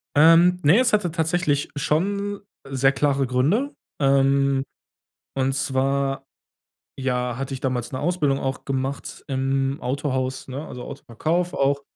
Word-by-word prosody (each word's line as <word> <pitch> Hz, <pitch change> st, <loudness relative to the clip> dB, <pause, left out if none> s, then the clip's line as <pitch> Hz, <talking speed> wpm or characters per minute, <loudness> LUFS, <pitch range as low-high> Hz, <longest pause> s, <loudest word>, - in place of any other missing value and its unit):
Ähm, 165 Hz, +4 st, +6 dB
ne, 160 Hz, +11 st, +6 dB
es 250 Hz, -3 st, +2 dB
hatte 200 Hz, -5 st, +2 dB
tatsächlich 160 Hz, -3 st, 0 dB
schon 200 Hz, +7 st, -1 dB, 0.3 s
sehr 135 Hz, 0 st, +2 dB
klare 140 Hz, -1 st, +1 dB
Gründe. 170 Hz, -, +1 dB, 0.3 s
Ähm, 135 Hz, 0 st, +3 dB, 0.7 s
und 135 Hz, 0 st, +1 dB
zwar, 135 Hz, 0 st, 0 dB, 0.7 s
ja, 125 Hz, -2 st, -1 dB
hatte 135 Hz, 0 st, -4 dB
ich 130 Hz, -, -4 dB
damals 125 Hz, -3 st, -2 dB
'ne 130 Hz, -, -4 dB
Ausbildung 150 Hz, -5 st, +1 dB
auch 135 Hz, -1 st, -3 dB
gemacht 135 Hz, +1 st, -4 dB
im 135 Hz, +1 st, 0 dB
Autohaus, 130 Hz, 0 st, -2 dB
ne, 135 Hz, +4 st, -5 dB
also, 125 Hz, -, -8 dB
Autoverkauf 160 Hz, +8 st, -2 dB
auch. 140 Hz, +1 st, +1 dB
140 Hz, 130 wpm, -23 LUFS, 135-160 Hz, 0.7 s, Ähm